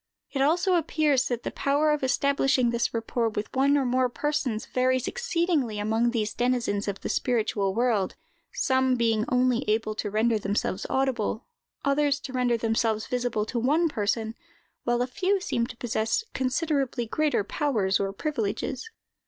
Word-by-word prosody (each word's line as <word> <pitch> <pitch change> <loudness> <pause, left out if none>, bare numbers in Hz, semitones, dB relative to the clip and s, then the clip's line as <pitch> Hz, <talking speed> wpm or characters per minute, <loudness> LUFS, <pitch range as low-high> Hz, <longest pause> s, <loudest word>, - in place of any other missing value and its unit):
It 275 - -1
also 345 +6 +3
appears 300 -4 +2
that 240 -3 -3
the - - -3
power 290 +2 +1
of 300 -2 0
establishing 270 -2 +2
this 235 0 0
rapport 230 0 -1
with 210 +2 -5
one 280 +2 +4
or 275 - +1
more 255 0 +2
persons, 260 -4 -2
varies 255 0 +1
exceedingly 340 - 0
among 220 +3 +1
these 220 -3 -1
denizens 240 -5 0
of 200 -1 -2
a - - +1
spiritual 210 -5 0
world, 230 -5 +1 0.4
some 260 -1 +2
being 225 -2 +1
only 250 0 +2
able 215 0 +1
to 210 -1 -3
render 220 +2 +2
themselves 200 -1 -2
audible, 255 -4 0 0.4
others 280 0 +2
to 260 - -7
render 250 -2 +2
themselves 225 -1 0
visible 245 -4 -1
to 235 +2 -2
one 305 +8 +2
person, 220 -2 -1 0.5
while 240 0 +2
a - - 0
few 375 +10 0
seem 235 -10 -1
to 245 - -10
possess 225 - -1
considerably 265 -2 0
greater 295 -1 +1
powers 210 -5 0
or 195 0 -1
privileges. 260 - -3
245 Hz, 160 wpm, -26 LUFS, 220-275 Hz, 0.5 s, one